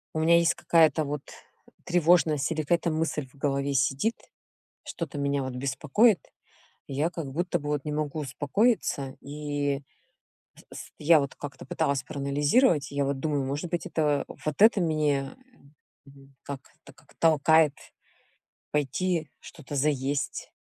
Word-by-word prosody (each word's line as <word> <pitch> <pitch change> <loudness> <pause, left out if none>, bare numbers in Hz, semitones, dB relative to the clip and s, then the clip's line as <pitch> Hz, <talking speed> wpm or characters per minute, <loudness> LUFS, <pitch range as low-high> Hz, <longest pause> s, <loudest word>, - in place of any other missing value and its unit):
У 155 - -2
меня 165 +2 +5
есть 170 -1 +3
какая-то 160 -2 +3
вот 145 0 -3 0.6
тревожность, 165 -4 +3
или 160 -1 -1
какая-то 170 +2 +1
мысль 155 -3 -2
в 130 - -25
голове 140 0 -1
сидит, 135 - +1 0.7
что-то 155 -4 -6
меня 140 0 0
вот 130 -1 -5
беспокоит, 145 - +2 0.7
и 140 - -7
я 150 +5 +1
как 165 -6 -6
будто 175 +5 -1
бы 145 - -6
вот 150 -2 -1
не 150 - -3
могу 150 0 -2
успокоиться, 145 - 0
и 145 -1 -3 0.9
с - - -9
я 155 +1 +5
вот 140 0 -4
как-то 140 -3 -8
пыталась 140 0 0
проанализировать, 145 - +2
я 140 0 -1
вот 140 0 -1
думаю, 145 -2 -1
может 145 +6 -4
быть 175 - -2
это, 150 -3 0 0.2
вот 155 +5 -1
это 220 -2 +6
меня, 150 - 0 0.7
м, 135 0 -18
как, 140 -2 -6 0.2
так - - -15
как - - -23
толкает 160 -1 +4 1.0
пойти 155 +3 -1
что-то 145 - -10
заесть. 140 -1 -1
145 Hz, 140 wpm, -27 LUFS, 140-160 Hz, 1.0 s, это